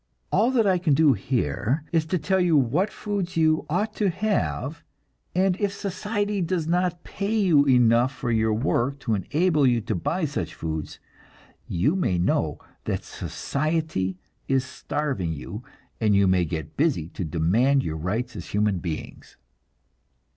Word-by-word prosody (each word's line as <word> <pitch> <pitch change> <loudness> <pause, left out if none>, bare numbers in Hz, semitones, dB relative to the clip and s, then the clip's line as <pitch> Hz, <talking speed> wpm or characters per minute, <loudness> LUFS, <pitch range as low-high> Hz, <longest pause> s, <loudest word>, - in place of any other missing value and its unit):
All 225 +4 +3
that 245 -4 +2
I 185 -2 +3
can 160 -5 +2
do 150 -2 +5
here 125 - -1
is 160 -2 +1
to 180 - +1
tell 190 +4 +1
you 175 -4 +4
what 145 - +2
foods 200 -5 -3
you 155 -1 +2
ought 205 +7 0
to 205 -2 +2
have, 170 - -1 0.5
and 185 0 +3
if 205 -2 +1
society 205 +1 -2
does 170 -1 -1
not 175 +1 0
pay 200 +2 -3
you 170 -9 +4
enough 125 -1 +4
for 130 -2 -3
your 110 -1 +2
work 125 +4 0
to 115 - -1
enable 150 - +2
you 120 -2 +3
to 110 +1 -2
buy 160 - -1
such 90 - -4
foods, 80 -2 -5 0.7
you 135 - +1
may 135 - +1
know 85 - +1 0.3
that - - -2
society, 150 - -2 0.3
is 135 -1 +1
starving 130 - -3
you, 95 - -7 0.4
and 105 -3 +3
you 100 0 +4
may 90 -1 +3
get 80 -2 -5
busy 140 - +1
to 95 - -5
demand 100 - +2
your 80 - -3
rights 110 +9 -3
as 90 -4 -7
human 105 -2 +1
beings. 85 -3 -7
140 Hz, 160 wpm, -25 LUFS, -, 0.7 s, do